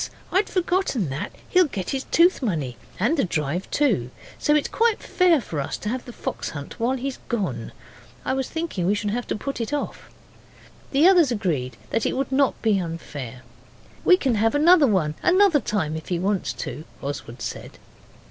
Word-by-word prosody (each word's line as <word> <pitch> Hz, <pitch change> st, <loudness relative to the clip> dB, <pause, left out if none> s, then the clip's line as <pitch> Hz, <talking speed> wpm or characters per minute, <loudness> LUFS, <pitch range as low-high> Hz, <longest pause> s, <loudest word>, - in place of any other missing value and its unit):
I'd 385 Hz, +3 st, +2 dB
forgotten 355 Hz, -, 0 dB
that. 150 Hz, +10 st, -4 dB, 0.2 s
He'll 365 Hz, -2 st, +4 dB
get 195 Hz, -9 st, -4 dB
his 270 Hz, -1 st, -2 dB
tooth 345 Hz, 0 st, +4 dB
money, 155 Hz, -, -2 dB, 0.2 s
and 240 Hz, -, +2 dB
the -, -, +3 dB
drive 165 Hz, 0 st, -2 dB
too. 215 Hz, -, +1 dB, 0.3 s
So 295 Hz, -, +3 dB
it's 300 Hz, -, +2 dB
quite 455 Hz, -1 st, +2 dB
fair 360 Hz, -4 st, +3 dB
for 165 Hz, -, -5 dB
us -, -, -3 dB
to 210 Hz, -, -4 dB
have 255 Hz, +2 st, -3 dB
the 245 Hz, -, -8 dB
fox -, -, -4 dB
hunt 145 Hz, +11 st, -8 dB
while 250 Hz, +3 st, +1 dB
he's 265 Hz, +1 st, -4 dB
gone. 170 Hz, -, -2 dB, 0.5 s
I 260 Hz, -, +1 dB
was 265 Hz, -1 st, -2 dB
thinking 320 Hz, -, -2 dB
we 205 Hz, -, +3 dB
should 205 Hz, 0 st, -2 dB
have 245 Hz, +2 st, -3 dB
to -, -, -1 dB
put 275 Hz, +3 st, -4 dB
it 230 Hz, -, -3 dB
off.' 290 Hz, -, -4 dB, 0.8 s
The 285 Hz, +5 st, +5 dB
others 350 Hz, -8 st, +6 dB
agreed 150 Hz, -, -1 dB
that 225 Hz, -, +1 dB
it -, -, -2 dB
would 270 Hz, 0 st, -1 dB
not 270 Hz, 0 st, +2 dB
be 215 Hz, -3 st, +3 dB
unfair. 145 Hz, -8 st, -6 dB, 0.6 s
'We 365 Hz, -, +7 dB
can 260 Hz, -9 st, +1 dB
have 225 Hz, +3 st, +3 dB
another 315 Hz, 0 st, +6 dB
one 180 Hz, -9 st, +1 dB
another 365 Hz, -3 st, +5 dB
time 185 Hz, -, -1 dB
if 160 Hz, -, -7 dB
he 175 Hz, -, 0 dB
wants 195 Hz, +2 st, 0 dB
to,' 155 Hz, -, -6 dB, 0.2 s
Oswald 135 Hz, -4 st, -5 dB
said. -, -, -6 dB
230 Hz, 190 wpm, -24 LUFS, -, 0.8 s, We